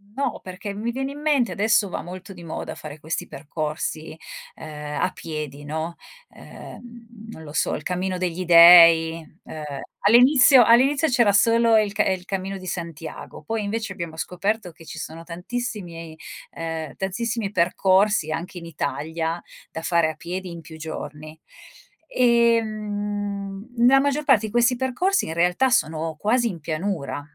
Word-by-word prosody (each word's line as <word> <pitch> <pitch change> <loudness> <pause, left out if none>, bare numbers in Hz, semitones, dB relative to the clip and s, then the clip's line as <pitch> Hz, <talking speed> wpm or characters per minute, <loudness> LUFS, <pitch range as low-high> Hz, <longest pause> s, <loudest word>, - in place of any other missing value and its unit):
no! 280 - -2
Perché 190 +2 -7
mi 220 +4 -3
viene 270 +3 -3
in 290 - -9
mente, 280 -9 +2
adesso 205 +2 +2
va - - -4
molto 185 +2 -9
di 175 -1 -12
moda 160 - -6
fare 155 0 -10
questi 160 +2 -4
percorsi, 155 +1 -5 0.4
uhm, 150 -1 -7
a 185 - +1
piedi, 150 -3 -7
no, 160 +3 -4 0.3
ehm, 235 -2 -13
non 160 -8 -10
lo 145 - -10
so 130 - 0
il 150 - -7
cammino 185 +1 -2
degli 180 0 -2
Dei, 165 -1 +8 0.2
uhm, 155 -1 -8 0.4
all'inizio 255 +2 +7
all'inizio 270 +7 +4
c'era 235 -5 +4
solo 230 +1 +4
il 210 -2 +1
ca 210 - +1
ehm, 190 - +2
il 180 - -16
Cammino 195 0 -4
di 185 - -11
Santiago, 165 -3 -7
poi 225 -1 -3
invece 220 0 -3
abbiamo 170 -3 -6
scoperto 180 +2 -2
che 165 +1 -17
ci - - -9
sono 165 +1 -7
tantissimi 175 -3 -6 0.4
uhm, 160 -3 -5
tantissimi 210 +2 -3
percorsi 185 -1 +2
anche 175 +3 -5
in 170 - -8
Italia, 160 +1 -3 0.3
da 160 - -6
fare 170 -2 +2
a 155 - -6
piedi 180 +3 -6
in 170 -1 -8
più 160 +1 -12
giorni. 155 0 -8 0.7
Ehm, 210 -4 0
nella 250 +3 +6
maggior 285 +2 0
parte 235 -7 +3
di 215 - -6
questi 240 +2 +3
percorsi 310 +10 0
in 160 - -4
realtà 180 +10 +2
sono 160 -6 0
quasi 235 +7 +1
in 175 -6 -5
pianura, 155 -2 -3
185 Hz, 160 wpm, -23 LUFS, 165-225 Hz, 0.7 s, Dei